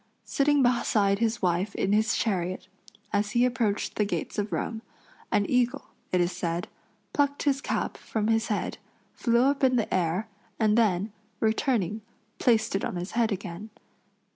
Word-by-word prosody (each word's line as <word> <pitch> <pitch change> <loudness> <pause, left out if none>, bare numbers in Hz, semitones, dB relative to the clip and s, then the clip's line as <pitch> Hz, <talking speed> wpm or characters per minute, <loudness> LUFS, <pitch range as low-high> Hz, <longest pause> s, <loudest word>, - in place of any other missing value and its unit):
Sitting 285 0 +3
beside 210 -5 +2
his 230 -1 0
wife 180 +3 0
in 195 - +1
his 220 +2 +3
chariot, 185 -4 -1 0.5
as 205 0 0
he 240 +1 +4
approached 230 -5 0
the 210 - +3
gates 205 +1 -3
of 205 +1 -2
Rome, 225 -1 -2 0.5
an 205 -2 +3
eagle, 250 +2 0 0.2
it 180 - +2
is 175 0 +2
said, 170 0 -3 0.5
plucked 285 -1 +1
his 275 -2 +1
cap - - -2
from 220 -2 -3
his 225 +1 +2
head, 210 - -2 0.3
flew 235 0 +2
up 275 +1 +1
in 255 -1 +4
the 230 -3 0
air, 185 +3 0 0.3
and 215 -2 +3
then, 210 -3 +2 0.3
returning, 220 -2 +1 0.4
placed 225 -3 +2
it 195 - -1
on - - -2
his 175 +2 -4
head 230 -1 +1
again. 195 +2 -5
220 Hz, 165 wpm, -27 LUFS, 195-240 Hz, 0.5 s, he